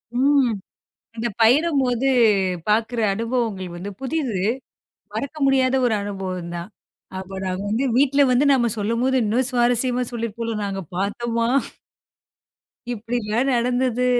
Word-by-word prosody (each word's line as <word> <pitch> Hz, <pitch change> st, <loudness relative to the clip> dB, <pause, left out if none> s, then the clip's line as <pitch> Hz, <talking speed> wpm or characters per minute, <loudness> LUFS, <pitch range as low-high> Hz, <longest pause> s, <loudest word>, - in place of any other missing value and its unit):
ம். 270 Hz, -1 st, +3 dB, 0.7 s
அந்த 230 Hz, +1 st, -1 dB
பயணம்மோது 265 Hz, 0 st, +3 dB, 0.6 s
பாக்குற 225 Hz, +3 st, +1 dB
அனுபவங்கள் 225 Hz, -5 st, -2 dB
வந்து 190 Hz, +4 st, -6 dB
புதிது. 265 Hz, -, -2 dB, 0.7 s
மறக்க 280 Hz, +2 st, -4 dB
முடியாத 265 Hz, -1 st, +3 dB
ஒரு 225 Hz, -3 st, +2 dB
அனுபவம்ந்தா. 185 Hz, -4 st, -5 dB, 0.5 s
அப்போ 190 Hz, +1 st, -7 dB
நாங்க 185 Hz, +1 st, -2 dB
வந்து 225 Hz, +5 st, 0 dB
வீட்ல 280 Hz, +1 st, +4 dB
வந்து 255 Hz, +4 st, +3 dB
நாம 240 Hz, -3 st, +2 dB
சொல்லம்போது 230 Hz, +5 st, +1 dB
இன்னா 225 Hz, +5 st, +1 dB
சுவாரஸ்யமா 245 Hz, 0 st, +2 dB
சொல்லிறுபோல. 230 Hz, 0 st, -3 dB
நாங்க 195 Hz, -1 st, -3 dB, 0.2 s
பாத்தம்மா 230 Hz, +4 st, -1 dB, 1.5 s
இப்டிலா 230 Hz, 0 st, -2 dB
நடந்தது. 250 Hz, +1 st, +1 dB
235 Hz, 105 wpm, -22 LUFS, 210-255 Hz, 1.5 s, வீட்ல